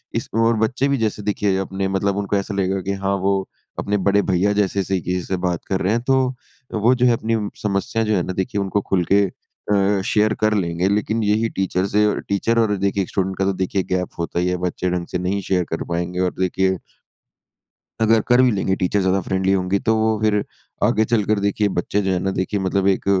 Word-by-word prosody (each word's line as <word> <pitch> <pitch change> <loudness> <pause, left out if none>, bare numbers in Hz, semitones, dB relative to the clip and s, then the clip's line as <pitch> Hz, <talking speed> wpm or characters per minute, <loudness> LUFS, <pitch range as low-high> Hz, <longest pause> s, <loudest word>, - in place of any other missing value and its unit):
इसमें 115 - -1
और 115 0 +3
बच्चे 125 +5 +1
भी 140 0 +1
जैसे 110 -3 -1
देखिए, 100 -2 0
अपने 95 0 -2
मतलब 95 +1 0
उनको 100 0 -1
ऐसा 100 0 -3
लगेगा 95 0 0
कि 100 +2 -2
हाँ, 100 0 -1
वो 95 0 0 0.3
अपने 105 0 0
बड़े 100 +1 +2
भईया 95 +1 +1
जैसे 100 -1 +1
से 95 0 -1
किसी 90 +1 -2
से 95 - -2
बात 90 -2 0
कर 95 -1 -1
रहे 95 - +1
हैं। 115 - 0
तो 135 - +4 0.6
वो 110 +3 +3
जो 125 0 +2
है 125 - +5
अपनी 115 0 -1 0.3
समस्या 105 +3 -1
जो 110 -1 +1
है 90 - +1
ना 95 - -4
देखिए 100 +3 -2
उनको 100 +1 0
खुल 95 -2 +2
के 100 +1 +6
अ, 100 +1 -1
शेयर 105 +1 +2
कर 110 0 +3
लेंगे 90 -2 0
लेकिन 110 +2 0
यही 105 +2 +1
टीचर 95 -2 -1
से 105 +1 +2
अ, 105 - +2 0.2
टीचर 115 +4 +1
और 110 -2 +2
देखिए 100 0 0
स्टूडेंट 95 0 -2
का 95 - +1
तो 100 - +1
देखिए 95 +1 -1
गैप 90 -1 0
होता 85 +1 -2
ही 90 - +1
है 90 0 0
बच्चे 90 +1 -2
ढँग 90 -1 -2
से - - 0
नहीं 90 +3 -1
शेयर 90 -1 0
कर 80 - -2
पाएँगे 90 +1 -2
और 90 -1 +1
देखिए 95 +1 +1 1.2
अगर 110 0 +4
कर 120 +1 +5
भी 130 -1 +4
लेंगे 95 -2 0
टीचर 90 +3 +1
ज़्यादा 95 +1 +2
फ्रेंडली 95 +1 0
होंगी 95 0 +1
तो 110 - +4
वो 110 -1 +1
फिर 105 -1 +2 0.4
आगे 110 - +3
चलकर 110 -2 +1
देखिए 100 +1 +1
बच्चे 100 +3 -1
जो 95 -1 0
हैं 90 - +1
ना 95 +2 -1
देखिए 95 +2 -2
मतलब 95 0 0
एक 95 - +1
100 Hz, 230 wpm, -21 LUFS, 95-105 Hz, 1.2 s, के